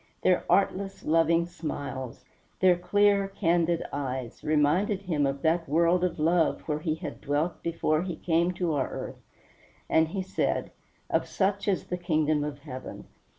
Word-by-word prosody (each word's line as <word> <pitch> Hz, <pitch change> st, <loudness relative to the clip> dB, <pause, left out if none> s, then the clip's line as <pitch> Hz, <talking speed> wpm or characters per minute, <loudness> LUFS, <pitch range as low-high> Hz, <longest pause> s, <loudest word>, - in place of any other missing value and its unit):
Their 180 Hz, -1 st, +3 dB
artless, 195 Hz, 0 st, +1 dB
loving 165 Hz, +1 st, +3 dB
smiles, 145 Hz, -7 st, -6 dB, 0.3 s
their 185 Hz, -1 st, +5 dB
clear, 200 Hz, +2 st, +3 dB
candid 170 Hz, -3 st, +1 dB
eyes, 130 Hz, -4 st, -4 dB
reminded 165 Hz, +7 st, +2 dB
him 155 Hz, -7 st, +1 dB
of 135 Hz, 0 st, -4 dB
that 165 Hz, 0 st, +1 dB
world 170 Hz, +4 st, +3 dB
of 180 Hz, -2 st, 0 dB
love 165 Hz, +1 st, +2 dB
where 150 Hz, -1 st, -2 dB
he 155 Hz, 0 st, -1 dB
had 160 Hz, -, -7 dB
dwelt 150 Hz, +4 st, -1 dB
before 160 Hz, -2 st, 0 dB
he 180 Hz, -2 st, -4 dB
came 170 Hz, +2 st, +1 dB
to 175 Hz, -2 st, -1 dB
our 140 Hz, -3 st, 0 dB
earth, -, -, -7 dB, 0.7 s
and 160 Hz, 0 st, +3 dB
he 190 Hz, +3 st, -3 dB
said, 190 Hz, -, -1 dB, 0.4 s
"Of -, -, +1 dB
such 200 Hz, +1 st, 0 dB
is 195 Hz, -2 st, 0 dB
the 180 Hz, -, -3 dB
kingdom 155 Hz, -4 st, +1 dB
of 145 Hz, -1 st, -5 dB
heaven." 130 Hz, -3 st, -8 dB
165 Hz, 155 wpm, -28 LUFS, 150-180 Hz, 0.7 s, their